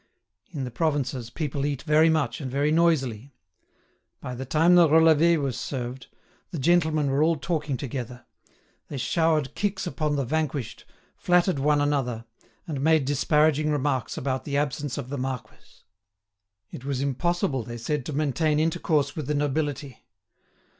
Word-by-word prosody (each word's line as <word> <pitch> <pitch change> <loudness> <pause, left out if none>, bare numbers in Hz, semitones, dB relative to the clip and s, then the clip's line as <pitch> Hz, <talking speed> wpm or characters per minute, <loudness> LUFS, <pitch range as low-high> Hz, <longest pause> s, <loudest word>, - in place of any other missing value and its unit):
In 150 -6 -5
the 125 - -5
provinces, 130 -3 -1
people 140 +1 -3
eat 145 -2 -2
very 155 +1 +4
much 155 -4 0
and 135 - -4
very 140 +3 +1
noisily. 140 -7 +1 0.8
By 125 - -6
the 130 +2 -6
time 160 +5 +4
the 175 -2 +7
relevé 160 +1 +5
was 135 -4 -2
served, 125 -1 -5 0.4
the 170 - -5
gentlemen 155 -1 +2
were 140 +2 +1
all 165 +2 +3
talking 150 -2 -2
together; 125 -2 -6 0.6
they 140 - -6
showered 155 0 +1
kicks 205 -2 -2
upon 155 -4 -1
the 140 -2 -1
vanquished, 145 -4 -3 0.3
flattered 180 -3 +2
one 145 +1 +2
another, 130 -6 -1 0.4
and 150 -7 -4
made 160 -1 +3
disparaging 150 +2 +2
remarks 140 -3 -1
about 130 -1 -2
the 140 -1 -2
absence 145 -1 -2
of 135 -3 -5
the 140 -1 -4
marquis. 130 -1 -7 0.9
It - - -9
was 135 -2 -2
impossible, 140 0 0
they 120 +1 -7
said, 140 +5 -2
to - - -3
maintain 150 +1 +1
intercourse 155 -2 0
with 150 -4 -5
the 150 - 0
nobility. 145 -2 -2
145 Hz, 155 wpm, -25 LUFS, 130-155 Hz, 0.9 s, the